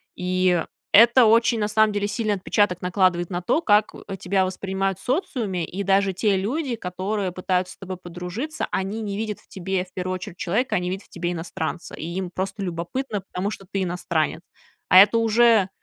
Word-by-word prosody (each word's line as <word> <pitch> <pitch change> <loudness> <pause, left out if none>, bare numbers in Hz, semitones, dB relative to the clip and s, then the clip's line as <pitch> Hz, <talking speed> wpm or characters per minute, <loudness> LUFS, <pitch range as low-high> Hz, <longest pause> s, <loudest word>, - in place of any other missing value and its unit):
И 180 -1 +1 0.3
это 235 +4 +8
очень, 230 +1 +4
на 210 0 0
самом 215 0 +3
деле, 205 0 0
сильный 215 -1 -1
отпечаток 190 -1 +1
накладывает 180 -1 +1
на 175 -1 -3
то, 285 - +1
как 210 -6 +3 0.3
тебя 190 +2 +1
воспринимают 190 0 -2
в - - -12
социуме. 235 - -1
И 195 +5 -5
даже 195 0 +3
те 200 +1 +1
люди, 245 +7 -1
которые 190 0 -3
пытаются 185 0 -1
с - - -41
тобой 190 -1 -6
подружиться, 180 - -5
они 195 +4 -2
не 205 -2 -4
видят 215 -1 -3
в - - -25
тебе 190 0 -3
в 180 - -25
первую 185 0 -3
очередь 185 -1 -7
человека, 210 +10 0
они 180 0 -1
видят 190 +2 -5
в - - -27
тебе 175 0 -3
иностранца. 165 0 -5
И - - -7
им 180 +1 -3
просто 190 +2 -4
любопытно, 195 +6 -3
потому 190 +2 -4
что 195 - -8
ты 195 -1 0
иностранец. 170 -3 -1 0.5
А 185 - +7
это 205 +4 +8
уже 225 -3 +4
190 Hz, 190 wpm, -23 LUFS, 180-215 Hz, 0.5 s, это